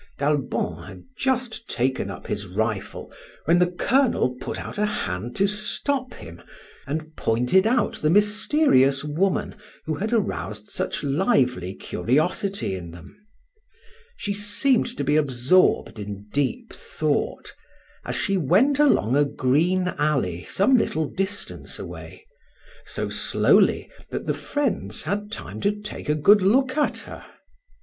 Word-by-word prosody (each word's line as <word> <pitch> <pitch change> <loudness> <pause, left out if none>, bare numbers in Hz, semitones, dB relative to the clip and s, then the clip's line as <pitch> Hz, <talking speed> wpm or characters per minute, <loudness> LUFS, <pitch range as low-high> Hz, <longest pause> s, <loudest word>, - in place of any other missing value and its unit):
D'Albon 145 -1 -1
had - - -11
just 245 -3 -1
taken 130 -5 -1
up 95 - -8
his 100 -1 -4
rifle 105 +5 -3 0.3
when 170 +3 +4
the 180 0 +3
Colonel 230 - +2
put - - -4
out - - -6
a 210 - +3
hand 115 - -4
to 195 - +3
stop 245 +6 -1
him, 85 +1 -11 0.5
and 155 +2 -4
pointed 125 - +2
out 240 +1 0
the 150 - +2
mysterious 205 - +3
woman 170 +6 0 0.3
who 155 - -1
had 210 +9 -3
aroused 105 - -2
such 190 -2 -3
lively 130 - +1
curiosity 155 - -1
in 90 -2 -6
them. 85 +1 -13 1.0
She 200 - -2
seemed 205 +6 +1
to - - -1
be 145 +2 +2
absorbed 135 -2 +2
in 100 -1 -7
deep 230 - -1
thought, - - -2 0.5
as - - -4
she 195 -2 0
went 200 - +3
along 205 - +3
a 145 - +5
green 160 +7 +1
alley 130 - 0
some 215 +8 +3
little 160 -8 0
distance 195 +6 -3
away, - - -9 0.6
so - - -3
slowly - - +3 0.2
that - - -4
the - - 0
friends 205 - -2
had 205 +1 -3
time - - -6
to 205 - +3
take 210 -6 -7
a 150 - +3
good 200 +8 +5
look 260 +7 +3
at 300 -1 +1
her. - - -10
175 Hz, 140 wpm, -24 LUFS, 130-210 Hz, 1.0 s, a